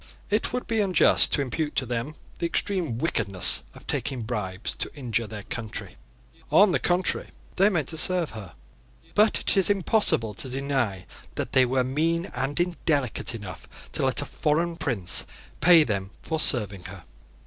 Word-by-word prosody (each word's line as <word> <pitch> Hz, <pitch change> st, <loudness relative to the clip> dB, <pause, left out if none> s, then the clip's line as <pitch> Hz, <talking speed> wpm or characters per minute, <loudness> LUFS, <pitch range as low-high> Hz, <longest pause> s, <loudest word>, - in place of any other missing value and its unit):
It 210 Hz, -, 0 dB
would 250 Hz, 0 st, -3 dB
be 225 Hz, -2 st, 0 dB
unjust 190 Hz, -5 st, +4 dB
to 140 Hz, -, +2 dB
impute 150 Hz, +3 st, -3 dB
to 130 Hz, -, 0 dB
them 120 Hz, +5 st, -4 dB, 0.2 s
the 170 Hz, -, 0 dB
extreme 170 Hz, -, -2 dB
wickedness 100 Hz, -, +2 dB
of -, -, -15 dB
taking 130 Hz, -4 st, -2 dB
bribes 105 Hz, -4 st, -4 dB
to -, -, -3 dB
injure 120 Hz, -5 st, -2 dB
their 105 Hz, -1 st, -8 dB
country. 110 Hz, 0 st, -6 dB, 0.6 s
On 200 Hz, 0 st, +6 dB
the -, -, +1 dB
contrary, 180 Hz, +1 st, 0 dB, 0.3 s
they 195 Hz, +2 st, +5 dB
meant 160 Hz, -9 st, -1 dB
to 160 Hz, -, -4 dB
serve 180 Hz, 0 st, +3 dB
her: 100 Hz, -5 st, -10 dB, 0.6 s
but 210 Hz, +1 st, +3 dB
it -, -, 0 dB
is 195 Hz, -1 st, +3 dB
impossible 195 Hz, -, +1 dB
to 130 Hz, +6 st, -5 dB
deny 130 Hz, -9 st, -2 dB, 0.3 s
that -, -, -4 dB
they 130 Hz, -1 st, +4 dB
were 130 Hz, +1 st, +1 dB
mean 165 Hz, +6 st, -1 dB
and 135 Hz, +5 st, -2 dB
indelicate 145 Hz, -9 st, -1 dB
enough 105 Hz, -4 st, -9 dB, 0.2 s
to -, -, -2 dB
let 135 Hz, +2 st, +3 dB
a -, -, -7 dB
foreign 165 Hz, +5 st, -1 dB
prince 110 Hz, -, 0 dB, 0.3 s
pay 170 Hz, -2 st, +7 dB
them 100 Hz, -7 st, -3 dB
for 160 Hz, -1 st, -2 dB
serving 105 Hz, -10 st, +5 dB
her. 95 Hz, -2 st, -9 dB
135 Hz, 170 wpm, -25 LUFS, 115-170 Hz, 0.6 s, pay